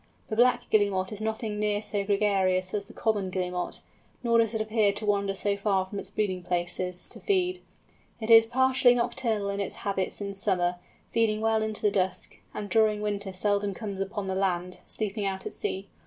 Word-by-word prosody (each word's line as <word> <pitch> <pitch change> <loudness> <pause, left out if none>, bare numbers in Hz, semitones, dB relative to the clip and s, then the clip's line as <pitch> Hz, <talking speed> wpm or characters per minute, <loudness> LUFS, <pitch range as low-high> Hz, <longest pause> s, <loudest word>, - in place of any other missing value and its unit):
The 215 - -2
Black 245 +1 +3
Guillemot 200 -3 +2
is 210 0 -6
nothing 220 -1 -2
near 210 -1 +1
so 205 -1 -2
gregarious 195 -2 +1
as 205 -1 -2
the - - -12
Common 205 -4 0
Guillemot, 180 -1 -3 0.4
nor 235 -1 +4
does 225 0 +2
it - - 0
appear 215 -1 +2
to 210 +2 -4
wander 200 -1 +1
so 200 +1 0
far 200 -2 +1
from 200 +1 -6
its 190 - -6
breeding 200 -3 -1
places 180 +1 -3
to - - -10
feed. 370 -2 +1 0.6
It 225 0 -1
is 225 0 +9
partially 260 0 +4
nocturnal 225 -4 0
in 200 - -3
its 200 - -2
habits 195 -2 -1
in 200 -1 -4
summer, 180 -3 0 0.3
feeding 225 -2 +2
well 220 0 +2
into 215 -1 -3
the 210 - +4
dusk, 185 -2 -2
and 205 - -5
during 215 -1 +2
winter 205 -2 -2
seldom 200 +1 0
comes 200 -3 -5
upon 195 +1 -3
the 190 - -2
land, 180 -2 -1
sleeping 210 -1 -3
out 190 -1 -4
at - - -5
sea. 195 +1 -3
205 Hz, 195 wpm, -28 LUFS, 190-220 Hz, 0.6 s, is